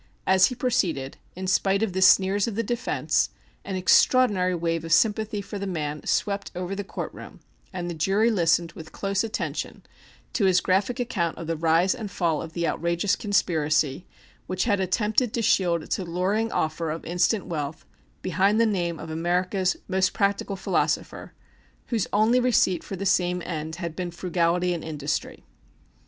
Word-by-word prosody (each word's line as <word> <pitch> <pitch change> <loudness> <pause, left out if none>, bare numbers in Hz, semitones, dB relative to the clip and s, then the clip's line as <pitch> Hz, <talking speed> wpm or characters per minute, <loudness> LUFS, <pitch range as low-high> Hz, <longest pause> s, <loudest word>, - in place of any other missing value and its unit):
As 190 0 +5
he 250 - -5
proceeded, 175 - -1 0.2
in 185 +1 -5
spite 195 +2 +2
of 205 -5 -1
the 190 - -1
sneers 195 +2 +5
of 225 - -4
the 230 - 0
defence, 240 +3 0 0.3
an 195 - -4
extraordinary 185 0 +4
wave 165 -1 -1
of 165 - -6
sympathy 215 +2 +2
for 200 +1 -6
the 200 - -4
man 150 -4 -3
swept 200 -1 0
over 180 +1 -4
the 205 - -4
court - - -6
room, - - -11 0.3
and 180 -2 -4
the 175 - -3
jury 195 +8 +2
listened 170 -3 +2
with 160 -1 -11
close 195 0 -1
attention 225 0 -4 0.5
to 210 - +1
his 185 -1 +4
graphic 200 +8 0
account 195 -9 -1
of 170 - -6
the 165 +1 -2
rise 165 +3 +3
and 215 -3 -6
fall 170 -5 0
of 160 0 -8
the 170 -1 -1
outrageous 170 +4 0
conspiracy 155 -6 0 0.4
which 185 0 -1
had 205 -4 +1
attempted 210 +5 +1
to 230 - -1
shield 175 -6 +2
its - - -2
alluring 190 +5 -1
offer 160 +1 -1
of 160 +2 -5
instant 180 +5 +1
wealth 150 -5 -5 0.4
behind 200 +5 +2
the 230 - +5
name 175 -6 -1
of 160 - -7
America's 180 +3 0
most 185 0 +1
practical 200 0 0
philosopher, 190 - -1 0.6
whose 230 -5 0
only 220 +4 +3
receipt 235 -8 +2
for 195 - -6
the 195 +2 -5
same 180 -1 +2
end 160 -2 -4
had 170 -2 -5
been 180 0 -3
frugality 175 0 0
and 170 - -5
industry. 150 -2 -4
185 Hz, 175 wpm, -25 LUFS, 170-205 Hz, 0.6 s, As